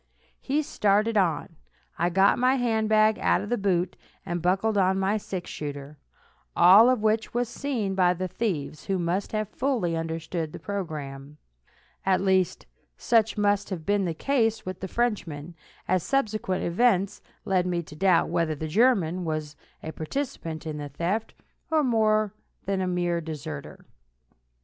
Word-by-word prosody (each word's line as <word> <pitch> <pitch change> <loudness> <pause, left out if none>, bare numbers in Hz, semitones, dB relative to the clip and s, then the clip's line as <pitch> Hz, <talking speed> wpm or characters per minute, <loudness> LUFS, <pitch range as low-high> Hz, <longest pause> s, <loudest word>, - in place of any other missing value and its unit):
He 290 +3 0
started 215 -5 +1
on. 165 -4 0 0.4
I 175 +1 +2
got 195 +5 +4
my 255 +2 +4
hand 225 -4 0
bag 215 0 +4
out - - +2
of 205 - -6
the 245 - +2
boot, 185 -2 0 0.3
and 175 0 -3
buckled 195 +5 +1
on 190 -1 +3
my 195 +2 +1
six 190 -3 -6
shooter, 145 0 -7 0.6
all 200 +7 +8
of 250 -4 +1
which 220 +1 0
was 245 0 +1
seen 235 -6 -2
by 180 -1 +3
the 185 +1 -3
thieves, 165 -8 -3
who 195 -1 0
must 175 +3 -1
have 215 -1 -1
fully 225 -8 -1
understood 165 0 -3
the - - -7
program; 150 -6 -6 0.7
at 190 -1 +2
least, 190 -2 +1 0.3
such 225 -2 +2
must 205 -1 +1
have 170 -5 -5
been 205 -1 +1
the 165 -2 -2
case 225 - 0
with 185 -1 -5
the 190 - -4
Frenchman, 175 -9 -2 0.3
as 185 0 +2
subsequent 215 -6 -1
events 200 +1 +1 0.2
led 185 -2 +1
me 175 -1 -1
to 150 - -12
doubt 180 +1 +3
whether 165 -2 0
the 155 +2 -5
German 185 -3 +2
was 155 -2 -3 0.3
a 160 - -5
participant 160 - -5
in 155 -1 -4
the 145 -1 -6
theft, 175 +10 -2 0.3
or 315 -2 +3
more 215 -4 +2 0.3
than 195 -1 -1
a 185 - -1
mere 175 -1 0
deserter. 155 -2 -7
190 Hz, 160 wpm, -26 LUFS, 165-215 Hz, 0.7 s, all